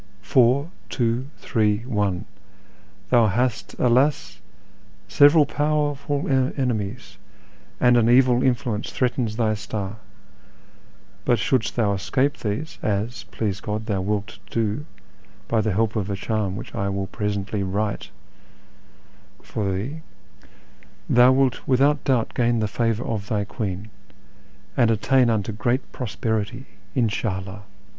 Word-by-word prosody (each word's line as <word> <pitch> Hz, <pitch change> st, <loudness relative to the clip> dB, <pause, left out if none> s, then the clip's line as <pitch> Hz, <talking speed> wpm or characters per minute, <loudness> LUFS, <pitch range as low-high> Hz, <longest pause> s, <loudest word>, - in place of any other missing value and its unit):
Four, 130 Hz, -, +3 dB, 0.2 s
tivo, 120 Hz, +1 st, 0 dB
three, 105 Hz, -3 st, 0 dB
one; 105 Hz, -5 st, -1 dB, 0.9 s
thou 120 Hz, -3 st, +5 dB
hast, 120 Hz, +3 st, -1 dB
alas! 130 Hz, +4 st, +2 dB, 0.7 s
several 145 Hz, +1 st, +6 dB
powerful 145 Hz, -1 st, -1 dB
enemies, 125 Hz, -6 st, -1 dB, 0.6 s
and 125 Hz, 0 st, +5 dB
an 115 Hz, -1 st, +4 dB
evil 125 Hz, 0 st, +5 dB
influence 120 Hz, -4 st, 0 dB
threatens 120 Hz, -3 st, -1 dB
thy 110 Hz, -2 st, +1 dB
star; 105 Hz, -1 st, -5 dB, 1.3 s
but 120 Hz, -, +3 dB
shouldst 110 Hz, +3 st, 0 dB
thou 105 Hz, -4 st, +2 dB
escape 135 Hz, +8 st, 0 dB
these 110 Hz, +9 st, -4 dB
(rs, 105 Hz, +2 st, -2 dB
please 100 Hz, -3 st, -2 dB
God, 105 Hz, +1 st, -3 dB
thou 100 Hz, -4 st, -1 dB
wilt 100 Hz, +1 st, -3 dB
do, 115 Hz, +6 st, -1 dB, 0.6 s
by 115 Hz, -1 st, +2 dB
the 110 Hz, -2 st, 0 dB
help 110 Hz, +3 st, +1 dB
of 105 Hz, -2 st, -1 dB
a 100 Hz, -, -1 dB
charm 105 Hz, -1 st, -2 dB
which -, -, -8 dB
I 100 Hz, 0 st, -1 dB
will 95 Hz, 0 st, -2 dB
presently 100 Hz, 0 st, -3 dB
write 100 Hz, +2 st, -2 dB, 1.3 s
for 100 Hz, -3 st, -2 dB
thee), 125 Hz, +12 st, -4 dB, 1.1 s
thou 125 Hz, +1 st, +6 dB
wilt 130 Hz, -1 st, +1 dB
without 140 Hz, +3 st, +3 dB
doubt 125 Hz, -4 st, +1 dB
gain 120 Hz, -2 st, +2 dB
the 110 Hz, -, +1 dB
favour 115 Hz, +2 st, 0 dB
of 105 Hz, -5 st, -3 dB
thy 105 Hz, -1 st, 0 dB
Queen, 105 Hz, -1 st, -5 dB, 0.8 s
and 120 Hz, -, +4 dB
attain 120 Hz, +3 st, +3 dB
unto 110 Hz, -2 st, 0 dB
great 120 Hz, +5 st, -1 dB
prosperity 110 Hz, +1 st, -3 dB, 0.2 s
— -, -, -30 dB
In 120 Hz, -4 st, +3 dB
sha 105 Hz, -2 st, -2 dB
'IWi 95 Hz, +2 st, -9 dB
115 Hz, 130 wpm, -23 LUFS, 105-125 Hz, 1.3 s, several